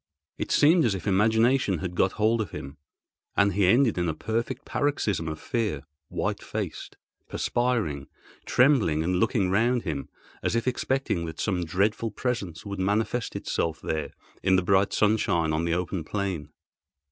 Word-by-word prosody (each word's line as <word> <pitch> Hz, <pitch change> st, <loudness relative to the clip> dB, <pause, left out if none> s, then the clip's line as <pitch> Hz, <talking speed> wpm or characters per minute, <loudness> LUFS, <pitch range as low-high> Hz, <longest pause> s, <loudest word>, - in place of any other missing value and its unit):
It -, -, -3 dB
seemed 160 Hz, +3 st, +5 dB
as 110 Hz, -5 st, +2 dB
if 95 Hz, -, -6 dB
his 100 Hz, -, 0 dB
imagination 110 Hz, +1 st, +3 dB
had 90 Hz, +2 st, -4 dB
got 95 Hz, +1 st, +2 dB
hold 110 Hz, +2 st, +2 dB
of 105 Hz, -, -4 dB
him, 70 Hz, +2 st, -8 dB, 0.6 s
and 100 Hz, -1 st, +4 dB
he 100 Hz, -1 st, +3 dB
ended 115 Hz, 0 st, +4 dB
in 85 Hz, -1 st, 0 dB
a 80 Hz, -, -2 dB
perfect 115 Hz, -, -3 dB
paroxysm 105 Hz, -, -1 dB
of 80 Hz, 0 st, -4 dB
fear—white 75 Hz, -, -3 dB
faced, -, -, -5 dB, 0.3 s
perspiring, 110 Hz, -, -1 dB, 0.4 s
trembling 120 Hz, -, +3 dB
and 90 Hz, +2 st, 0 dB
looking 95 Hz, -2 st, +1 dB
round 120 Hz, +4 st, +2 dB
him, 75 Hz, -6 st, -4 dB, 0.3 s
as -, -, 0 dB
if 115 Hz, +2 st, 0 dB
expecting 130 Hz, -8 st, 0 dB
that 80 Hz, 0 st, -8 dB
some 90 Hz, -5 st, 0 dB
dreadful 105 Hz, +7 st, 0 dB
presence 105 Hz, -7 st, -3 dB
would 100 Hz, -1 st, -5 dB
manifest 110 Hz, +5 st, 0 dB
itself 80 Hz, -1 st, -2 dB
there 80 Hz, -2 st, -3 dB, 0.3 s
in 95 Hz, 0 st, +3 dB
the 95 Hz, -, +2 dB
bright 95 Hz, +2 st, +3 dB
sunshine 95 Hz, -7 st, +2 dB
on 80 Hz, +2 st, 0 dB
the 85 Hz, 0 st, +1 dB
open 90 Hz, -1 st, -2 dB
plain. 95 Hz, -5 st, -3 dB
100 Hz, 160 wpm, -26 LUFS, 85-115 Hz, 0.6 s, seemed